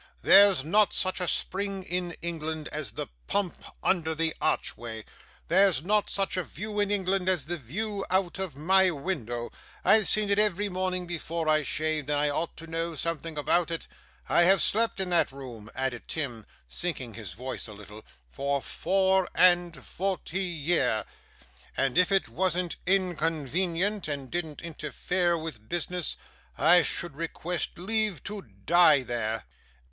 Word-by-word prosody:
There's 200 Hz, -7 st, +7 dB
not 205 Hz, +7 st, +3 dB
such 185 Hz, 0 st, 0 dB
a 180 Hz, -, -1 dB
spring 195 Hz, +2 st, -1 dB
in 180 Hz, -1 st, -3 dB
England 160 Hz, -2 st, -3 dB
as 145 Hz, -8 st, -5 dB
the -, -, -4 dB, 0.2 s
pump 200 Hz, -4 st, -1 dB, 0.2 s
under 160 Hz, -4 st, +1 dB
the 160 Hz, 0 st, 0 dB
archway. 115 Hz, -7 st, -2 dB, 0.4 s
There's 195 Hz, -5 st, +4 dB
not 210 Hz, +3 st, +2 dB
such 195 Hz, -1 st, -1 dB
a 185 Hz, -, 0 dB
view 210 Hz, +6 st, -5 dB
in 205 Hz, -1 st, +2 dB
England 190 Hz, -2 st, +1 dB
as 180 Hz, -8 st, +1 dB
the 175 Hz, +3 st, -2 dB
view 195 Hz, -, -4 dB
out 185 Hz, 0 st, 0 dB
of 190 Hz, -7 st, -4 dB
my 190 Hz, +5 st, +4 dB
window; 135 Hz, -, -4 dB, 0.3 s
I've 215 Hz, -2 st, +5 dB
seen 210 Hz, -1 st, +4 dB
it 200 Hz, -, +4 dB
every 205 Hz, -1 st, +2 dB
morning 185 Hz, -1 st, -2 dB
before 170 Hz, -1 st, -3 dB
I 155 Hz, 0 st, +4 dB
shaved, 155 Hz, 0 st, -1 dB
and 145 Hz, -1 st, +1 dB
I 145 Hz, 0 st, +2 dB
ought 165 Hz, +3 st, -3 dB
to 165 Hz, -, -9 dB
know 165 Hz, 0 st, -3 dB
something 165 Hz, 0 st, -4 dB
about 170 Hz, +3 st, +2 dB
it. 165 Hz, -1 st, -4 dB, 0.4 s
I -, -, +4 dB
have 195 Hz, +2 st, +5 dB
slept 225 Hz, -2 st, +2 dB
in 185 Hz, -2 st, -2 dB
that 170 Hz, -, +3 dB
room,' 125 Hz, -6 st, -9 dB
added 130 Hz, -2 st, -3 dB
Tim, 125 Hz, -9 st, -4 dB, 0.2 s
sinking 125 Hz, -, -3 dB
his 105 Hz, -5 st, -7 dB
voice 125 Hz, +6 st, -5 dB
a 110 Hz, -, -9 dB
little, 105 Hz, +1 st, -12 dB, 0.2 s
'for 140 Hz, -, -1 dB
four 190 Hz, +7 st, +1 dB
and 175 Hz, -5 st, +4 dB
forty 190 Hz, -1 st, -2 dB
year; 160 Hz, -, +1 dB, 0.7 s
and 135 Hz, -2 st, +1 dB
if 180 Hz, +2 st, +4 dB
it 195 Hz, -1 st, +2 dB
wasn't 180 Hz, -2 st, -1 dB
inconvenient, 175 Hz, -, 0 dB
and 140 Hz, -3 st, -5 dB
didn't 165 Hz, -3 st, -3 dB
interfere 170 Hz, +2 st, -1 dB
with 145 Hz, -10 st, -7 dB
business, 175 Hz, -1 st, -2 dB, 0.4 s
I 175 Hz, +2 st, +6 dB
should 165 Hz, -1 st, -2 dB
request 165 Hz, +2 st, -3 dB
leave 210 Hz, -2 st, -1 dB
to 205 Hz, 0 st, -5 dB, 0.2 s
die 165 Hz, -5 st, +6 dB
there. 115 Hz, -2 st, -2 dB
170 Hz, 155 wpm, -28 LUFS, 145-190 Hz, 0.7 s, There's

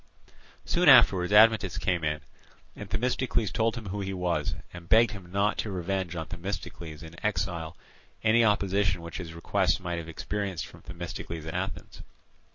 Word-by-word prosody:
Soon 175 Hz, -3 st, +4 dB
afterwards 100 Hz, -8 st, +7 dB
Admetus 105 Hz, -3 st, +5 dB
came 90 Hz, -3 st, 0 dB
in, 75 Hz, -1 st, -1 dB, 0.5 s
and 105 Hz, -, -8 dB
Themistocles 125 Hz, -1 st, 0 dB
told 115 Hz, 0 st, +1 dB
him 110 Hz, -5 st, -6 dB
who 100 Hz, +2 st, -3 dB
he 95 Hz, 0 st, -3 dB
was, 85 Hz, -5 st, -1 dB, 0.2 s
and 85 Hz, -1 st, -11 dB
begged 115 Hz, 0 st, +6 dB
him 95 Hz, -4 st, -10 dB
not 100 Hz, +2 st, +1 dB
to 110 Hz, -, -2 dB
revenge 95 Hz, -1 st, -2 dB
on 80 Hz, -1 st, -3 dB
Themistocles 85 Hz, -3 st, -6 dB
in 80 Hz, +4 st, -12 dB
exile 90 Hz, -5 st, -2 dB, 0.5 s
any 115 Hz, +1 st, +5 dB
opposition 100 Hz, -3 st, +1 dB
which 85 Hz, -, -7 dB
his 85 Hz, -2 st, -7 dB
requests 90 Hz, +1 st, +1 dB
might 85 Hz, -2 st, -3 dB
have 80 Hz, 0 st, -8 dB
experienced 95 Hz, -1 st, -3 dB
from -, -, -14 dB
Themistocles 85 Hz, -1 st, -7 dB
at 80 Hz, -, -5 dB
Athens. 95 Hz, +2 st, -5 dB
95 Hz, 165 wpm, -28 LUFS, 85-105 Hz, 0.5 s, afterwards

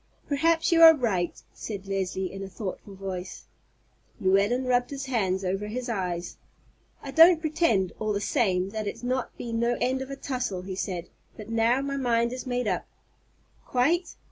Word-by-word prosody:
"Perhaps 325 Hz, +4 st, +2 dB
you 335 Hz, -1 st, +5 dB
are 325 Hz, -1 st, +10 dB
right," 200 Hz, -, -1 dB
said 200 Hz, -3 st, -6 dB
Leslie, 190 Hz, -1 st, -2 dB
in 195 Hz, -, -7 dB
a 195 Hz, -, -6 dB
thoughtful 195 Hz, 0 st, -7 dB
voice. 190 Hz, -1 st, -6 dB, 0.7 s
Llewellyn 200 Hz, +7 st, +2 dB
rubbed 245 Hz, -1 st, +2 dB
his 275 Hz, -1 st, -5 dB
hand 195 Hz, -7 st, 0 dB
over 195 Hz, +3 st, -2 dB
his 245 Hz, +3 st, -4 dB
eyes. 180 Hz, -5 st, -3 dB, 0.7 s
"I 275 Hz, -, -6 dB
don't 330 Hz, +3 st, +7 dB
pretend, 310 Hz, -, +1 dB
all 215 Hz, -1 st, -1 dB
the 200 Hz, -, 0 dB
same, 195 Hz, -5 st, +1 dB
that 215 Hz, -1 st, -4 dB
it's 205 Hz, -, -6 dB
not 255 Hz, +1 st, -2 dB
been 230 Hz, -1 st, -3 dB
no 235 Hz, +1 st, +1 dB
end 260 Hz, +2 st, 0 dB
of 265 Hz, -, -6 dB
a 275 Hz, -, -5 dB
tussle," 250 Hz, -10 st, -3 dB
he 190 Hz, 0 st, -5 dB
said; 180 Hz, -2 st, -4 dB, 0.3 s
"but 215 Hz, 0 st, -9 dB
now 230 Hz, +3 st, +2 dB
my 275 Hz, 0 st, -3 dB
mind 235 Hz, -2 st, +1 dB
is 255 Hz, +1 st, -6 dB
made 245 Hz, -2 st, -1 dB
up." 185 Hz, -3 st, -1 dB, 0.8 s
"Quite?" 325 Hz, +8 st, +1 dB
230 Hz, 175 wpm, -27 LUFS, 195-260 Hz, 0.8 s, are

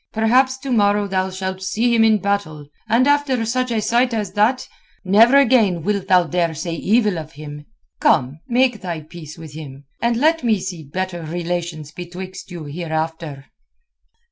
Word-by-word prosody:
Perhaps 255 Hz, +4 st, +3 dB
to 265 Hz, 0 st, -6 dB
morrow 205 Hz, -2 st, +2 dB
thou 190 Hz, -1 st, -1 dB
shalt 190 Hz, 0 st, -5 dB
see 225 Hz, +5 st, 0 dB
him 225 Hz, -1 st, +4 dB
in 220 Hz, -1 st, +5 dB
battle, 195 Hz, -7 st, -2 dB, 0.2 s
and 235 Hz, +3 st, +4 dB
after 285 Hz, -5 st, +2 dB
such 255 Hz, +2 st, -1 dB
a 230 Hz, -2 st, 0 dB
sight 240 Hz, +3 st, +1 dB
as 210 Hz, -3 st, -3 dB
that 220 Hz, +5 st, +1 dB, 0.4 s
never 225 Hz, +8 st, +6 dB
again 225 Hz, -, +3 dB
wilt 200 Hz, 0 st, -1 dB
thou 185 Hz, -2 st, +5 dB
dare 170 Hz, 0 st, -1 dB
say 165 Hz, +2 st, -4 dB
evil 210 Hz, +1 st, +1 dB
of 155 Hz, 0 st, -10 dB
him. 150 Hz, 0 st, -10 dB, 0.3 s
Come, 135 Hz, +5 st, +2 dB
make 245 Hz, -3 st, +2 dB
thy 170 Hz, -4 st, -4 dB
peace 155 Hz, 0 st, -11 dB
with 160 Hz, -3 st, -10 dB
him, 140 Hz, -3 st, -10 dB, 0.2 s
and 235 Hz, 0 st, +1 dB
let 315 Hz, +3 st, +2 dB
me 220 Hz, -4 st, +2 dB
see 180 Hz, -3 st, -6 dB
better 180 Hz, +4 st, -4 dB
relations 170 Hz, -2 st, -4 dB
betwixt 180 Hz, +3 st, -8 dB
you 175 Hz, -3 st, -7 dB
hereafter." 160 Hz, -2 st, -4 dB
190 Hz, 170 wpm, -20 LUFS, 165-230 Hz, 0.4 s, never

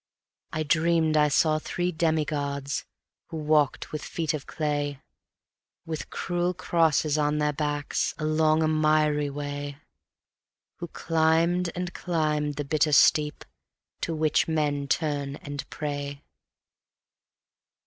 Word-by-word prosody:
I 155 Hz, -, -1 dB
dreamed 160 Hz, 0 st, +2 dB
I 150 Hz, -1 st, +5 dB
saw 155 Hz, +1 st, +3 dB
three 175 Hz, +3 st, -2 dB
demi 160 Hz, -2 st, +1 dB
gods 140 Hz, -2 st, -3 dB, 0.4 s
who 160 Hz, -, -6 dB
walked 150 Hz, -2 st, +1 dB
with 155 Hz, -, -4 dB
feet 160 Hz, -2 st, -2 dB
of 150 Hz, -2 st, -5 dB
clay, 145 Hz, -2 st, -2 dB, 0.9 s
With 160 Hz, -2 st, -5 dB
cruel 175 Hz, 0 st, -1 dB
crosses 160 Hz, -4 st, +2 dB
on 150 Hz, 0 st, +1 dB
their 150 Hz, 0 st, +1 dB
backs, 145 Hz, 0 st, -1 dB
along 155 Hz, 0 st, +2 dB
a -, -, +2 dB
miry 155 Hz, -1 st, +2 dB
way; 145 Hz, 0 st, -5 dB, 1.0 s
Who 175 Hz, -, -6 dB
climbed 165 Hz, +2 st, +1 dB
and 180 Hz, -1 st, -3 dB
climbed 150 Hz, -4 st, -1 dB
the 145 Hz, -, -3 dB
bitter 150 Hz, +1 st, +2 dB
steep 150 Hz, +1 st, +4 dB, 0.6 s
to 165 Hz, -, -2 dB
which 155 Hz, -1 st, +2 dB
men 145 Hz, -3 st, 0 dB
turn 145 Hz, -2 st, -1 dB
and 145 Hz, -1 st, -7 dB
pray. 145 Hz, -1 st, -4 dB
155 Hz, 120 wpm, -27 LUFS, 145-160 Hz, 1.0 s, I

